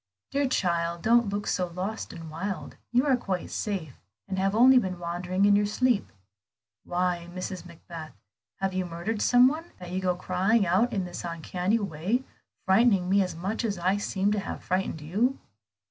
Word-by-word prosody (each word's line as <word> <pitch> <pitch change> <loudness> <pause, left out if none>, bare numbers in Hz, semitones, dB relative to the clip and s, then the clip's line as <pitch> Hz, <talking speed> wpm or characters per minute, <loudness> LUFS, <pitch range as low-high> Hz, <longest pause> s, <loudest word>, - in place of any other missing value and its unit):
"Dear 280 0 +1
child, 170 -7 0
don't 235 -1 +4
look 205 +1 -2
so 180 - 0
lost 185 +5 -4
and 165 -2 -9
wild. 190 +5 -4 0.2
You 250 +3 +3
are 275 -3 +4
quite 190 -7 -3
safe, 185 - -4 0.3
and 190 - -2
have 195 +2 +1
only 255 +3 +7
been 185 -5 -3
wandering 180 +3 -1
in 205 0 +6
your 205 0 +3
sleep. 240 0 +1 0.7
Why, 175 -1 -1
Mrs. 185 0 -5
Macbeth, 165 -2 -10 0.4
have 195 -1 -2
you 185 0 0
murdered 180 +5 -3
some 245 +1 +6
one, 320 +5 -3
that 180 -1 -9
you 185 +1 -1
go 180 -1 +1
crying 190 +4 +2
out 190 +8 +2
in 190 -3 -1
this 175 - -7
uncanny 180 +4 -1
way, 200 +5 -1 0.4
frightening 190 -2 +4
me 200 0 +5
as 180 -3 -2
much 195 +8 -3
as 205 -4 -1
I 185 +3 +1
seem 205 0 0
to 210 - +1
have - - -6
frightened 185 -3 -1
you?" 215 - 0
190 Hz, 180 wpm, -27 LUFS, 175-215 Hz, 0.7 s, only